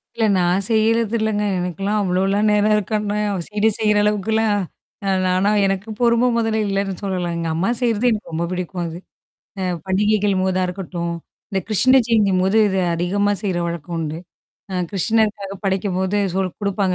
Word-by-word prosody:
இல்ல, 225 - +1
நான் 180 +2 +2
செய்யறது 225 0 +2
இல்லங்க. 215 -1 0 0.2
எனக்கெல்லாம் 195 +4 -2
அவ்ளோலாம் 195 +3 +1
நேரம் 210 +1 +3
இருக்கனா 210 0 -1 0.3
சிட 210 +1 -1
செய்யிற 210 -1 +2
அளவுக்குலாம் 210 +1 +1 0.5
அ - - +2 0.2
நானா 185 +2 +2 0.2
எனக்கு 195 +3 -2
பொறும 240 +1 +3
மொதல்ல 225 -1 0
இல்லன்னு 195 0 -1
சொல்லலாம். 180 -3 -2
எங்க 165 -1 -2
அம்மா 180 +7 0
செய்யிறது 235 -1 +1
எனக்கு 210 -6 -4
ரொம்ப 165 +2 -1
புடிக்கும் 180 0 -3
அது. 165 0 -6 0.6
அ - - -2 0.2
பண்டிகைகள் 205 +1 +2
போதா 185 0 +1
இருக்கட்டும். 175 -2 -4 0.4
இந்த 195 -2 0
கிருஷ்ண 255 +5 +4
ஜெயந்தின்போது 200 -3 +2
இது 190 -1 0
அதிகமா 200 +4 0
செய்ற 185 -4 -1
வழக்கம் 170 0 -5
உண்டு. 155 0 -3 0.5
ஆ - - -4 0.2
கிருஷ்ணருக்காக 210 0 0
படைக்கும்போது 190 0 0 0.2
சொல் 190 -1 0
குடுப்பாங்க 200 -2 0
200 Hz, 150 wpm, -20 LUFS, 185-215 Hz, 0.6 s, கிருஷ்ண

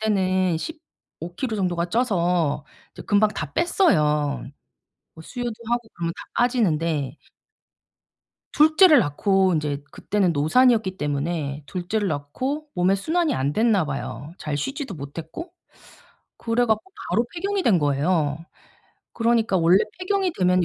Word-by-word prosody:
때는 185 -5 +1
15 175 - -10
킬로 235 -5 -2
정도가 175 -3 0
쪄서 175 - 0 0.3
이제 - - -10
금방 210 +1 +3
다 155 -8 -5
뺐어요. 150 - +2 0.7
뭐 160 - -12
수유도 245 +4 -4 0.2
하고 240 -1 -1
그러면 170 -1 -3
다 - - -9 0.2
빠지는데 165 - 0 1.3
2 310 +1 +4
째를 360 -7 +8
낳고 190 +5 +2
인제 150 -3 -2
그때는 195 -3 0
노산이었기 190 - +3
때문에 145 -1 -2
2 175 +4 -6
째를 210 0 0
낳고 255 - -3
몸에 180 +2 +3
순환이 320 - 0
안 135 +2 0
됐나 220 -4 +2
봐요 145 +2 -6
잘 150 -1 -3
쉬지도 270 - -4
못했고. 160 - -8 0.9
그래 235 +1 +1
갖고 220 -2 +1 0.3
바로 235 +2 +2
폐경이 390 +2 -2
된 195 -7 +4
거예요. 145 +1 +1 0.8
그러니까 230 -4 +1
원래 170 +3 +5 0.2
폐경이 375 -1 0
되면 180 -1 +3
185 Hz, 270 characters per minute, -23 LUFS, 155-240 Hz, 1.3 s, 째를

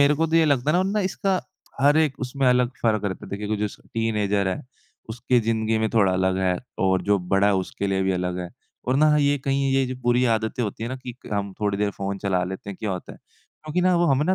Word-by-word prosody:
मेरे 140 +1 +5
को 160 +2 +1
तो 165 +1 +1
ये 165 - +5
लगता 145 +2 +2
है - - +3
ना 215 - +1
इसका 190 0 0 0.4
हर 145 +2 +5
एक 155 -4 +2
उसमें 130 +1 -1
अलग 125 -1 +3
फ़र्क 110 -2 +1
रहता 95 -2 -3
है। - - -10
देखिए 100 +1 -4
कोई 110 - 0
जैसे 105 -1 -4
टीनेजर 105 -3 0
है, 95 - -3 0.5
उसकी 120 +2 +1
जिंदगी 110 0 0
में 110 0 +1
थोड़ा 100 -5 +3
अलग 95 0 +1
है 90 -1 +1 0.2
और 95 -1 +2
जो 100 +1 +2
बड़ा 95 +1 +4
है 105 - +3
उसके 95 +1 -2
लिए 95 0 0
भी 95 0 +1
अलग 90 0 -2
है 90 -1 -4 0.4
और 130 - +3
ना 150 +1 +5
ये 145 -1 +2
कहीं 135 0 +1
ये 135 0 +3
जो 130 - -4
बुरी 120 +1 +3
आदतें 110 +2 -2
होती 105 0 -4
हैं 115 - -3
ना 130 - -3
कि 125 -1 -8
क - - -8
हम 100 -1 -2
थोड़ी 100 -1 0
देर 105 0 +1
फ़ोन 100 0 -4
चला 95 -2 0
लेते 95 +2 -6
हैं 100 - -8
क्या 110 - -2
होता 90 -1 -5
है? - - -14 0.5
क्योंकि 155 +4 -1
ना 185 0 +3
वो 175 - +3
हमें 135 +1 +2
ना 185 - +2
110 Hz, 265 wpm, -24 LUFS, 100-135 Hz, 0.5 s, मेरे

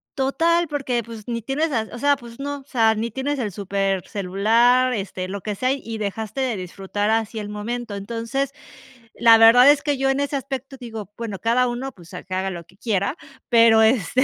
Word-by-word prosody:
Total, 330 +5 +1
porque, 260 -5 -2
pues, 225 -2 -10
ni 235 -2 -3
tienes, 285 +7 -1 0.2
o 240 - -7
sea, 285 +1 +3
pues 240 -2 -13
no, 285 0 -4
o - - -19
sea, 225 -5 +2
ni 230 +2 -3
tienes 275 +4 -2
el 215 -6 -2
supercelular, 200 +5 +1
este, 190 -2 -4
lo 200 +1 -5
que 210 +1 -3
sea, 255 +6 0
y 225 -5 -6
dejaste 215 +5 -4
de 255 -4 0
disfrutar 195 +3 -3
así 225 0 -1
el 210 -1 -5
momento. 220 +2 -5
Entonces, 230 +7 -3 0.6
la 230 -1 +6
verdad 235 +4 +8
es 290 0 +4
que 290 -2 +1
yo 270 0 0
en 270 - +1
ese 285 0 -1
aspecto, 270 0 -5
digo, 220 -5 -8
bueno, 220 -4 -5
cada 245 +4 +2
uno, 245 +3 -4
pues, 175 -5 -14
a - - -7
que 185 - -8
haga 190 +1 -1
lo 175 -2 -7
que 185 +2 -23
quiera, 205 - -1 0.3
pero, 230 -2 +6
este, 225 +2 +2
230 Hz, 200 wpm, -22 LUFS, 205-265 Hz, 0.6 s, verdad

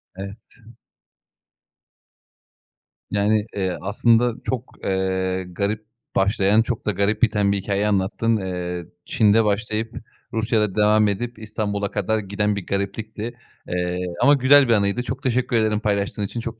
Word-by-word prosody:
Evet. 100 +3 -7 2.7
Yani, 105 +1 +2
eee, 95 -3 -1
aslında 115 +4 +3
çok, 125 -1 -4
eee, 95 -1 0
garip 100 +4 -3 0.3
başlayan, 100 +2 +3
çok 115 -1 -3
da 105 - +2
garip 100 +2 0
biten 105 -3 +3
bir 100 - +1
hikâye 100 +1 -1
anlattın. 105 +3 +1
Eee, 90 -2 -4 0.2
Çin'de 110 0 +3
başlayıp, 110 +2 -1 0.4
Rusya'da 110 -3 +1
devam 105 0 +4
edip, 115 +3 -3
İstanbul'a 105 -2 -3
kadar 110 +2 0
giden 105 +1 -1
bir 100 - -5
gariplikti, 110 +3 -3 0.3
eee, 90 0 -2 0.2
ama 140 +4 +6
güzel 140 +1 +6
bir 115 - +4
anıydı, 100 +3 +1
çok 130 +3 -5
teşekkür 125 -1 0
ederim 110 -1 +2
paylaştığın 100 -1 -1
için, 110 +4 -4
çok 115 -1 -6
105 Hz, 135 wpm, -22 LUFS, 100-115 Hz, 2.7 s, ama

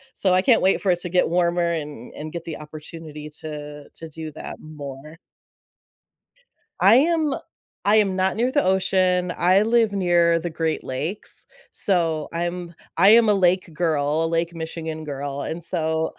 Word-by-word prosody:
So 190 -2 +2
I 185 - +4
can't 230 +2 +4
wait 190 - +2
for 195 - 0
it 175 - 0
to 180 - -5
get 180 +1 +2
warmer 170 0 +1
and 150 -7 -6
and 155 +1 -7
get 170 -1 -5
the 165 - -5
opportunity 150 0 -9
to 150 -1 -8
to 165 - -9
do 155 0 -7
that 155 - -8
more. 150 0 -9 1.6
I 195 +5 +7
am 315 0 +2 0.5
I 205 +1 +5
am 200 -3 +2
not 190 0 +1
near 240 +4 +1
the 290 +1 +2
ocean, 185 -1 +2
I 185 +3 +4
live 225 -1 +2
near 175 -3 +3
the 175 +1 -4
Great 160 -1 -2
Lakes. 155 +10 -5 0.3
So 165 -5 +1
I'm 175 +1 -3 0.2
I 190 +4 +6
am 225 0 +7
a - - +5
lake 185 -2 +2
girl, 155 -1 0
Lake 165 +1 -1
Michigan 160 -1 -5
girl 140 -1 -5
and 165 +4 -4
so 160 -2 -1
170 Hz, 165 wpm, -23 LUFS, 155-185 Hz, 1.6 s, I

